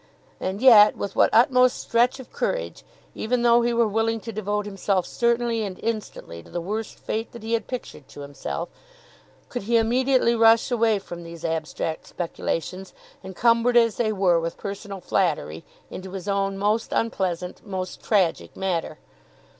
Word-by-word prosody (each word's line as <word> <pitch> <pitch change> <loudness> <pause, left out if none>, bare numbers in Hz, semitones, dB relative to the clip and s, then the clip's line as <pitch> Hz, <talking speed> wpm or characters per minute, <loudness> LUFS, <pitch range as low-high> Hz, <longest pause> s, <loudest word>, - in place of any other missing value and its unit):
And 195 +5 -3
yet, 215 -5 +8
with 200 - -4
what - - +5
utmost 250 +2 +4
stretch 240 +3 +1
of 260 - -11
courage, - - -3 0.3
even 240 +2 -1
though 235 0 +5
he 240 0 +1
were 235 -1 +2
willing 225 +2 0
to 230 - -6
devote 210 -1 -2
himself 195 -2 -1
certainly 235 0 0
and 195 -3 -4
instantly 215 - -4
to - - -17
the 175 - -4
worst 210 +6 -4
fate 225 +1 -4
that 235 -2 -10
he 225 +1 -3
had 230 - 0
pictured 245 - -7
to 145 - -11
himself, 145 +4 -5 0.8
could 245 - -5
he 230 +4 +2
immediately 250 +2 +2
rush 225 +2 +4
away 230 -3 +3
from 175 -3 -8
these 170 -1 -9
abstract 160 0 -3
speculations, 180 +2 -4 0.3
encumbered 230 +5 +2
as 230 -2 +3
they 220 -2 +1
were 190 -4 +3
with 165 0 -4
personal 200 -1 -6
flattery, 155 - -1 0.3
into 190 0 -8
his 190 0 -6
own 195 -1 0
most 210 +3 0
unpleasant, 180 -5 -2
most 185 -2 -5
tragic 170 - 0
matter! 185 -3 -2
210 Hz, 160 wpm, -24 LUFS, 185-230 Hz, 0.8 s, yet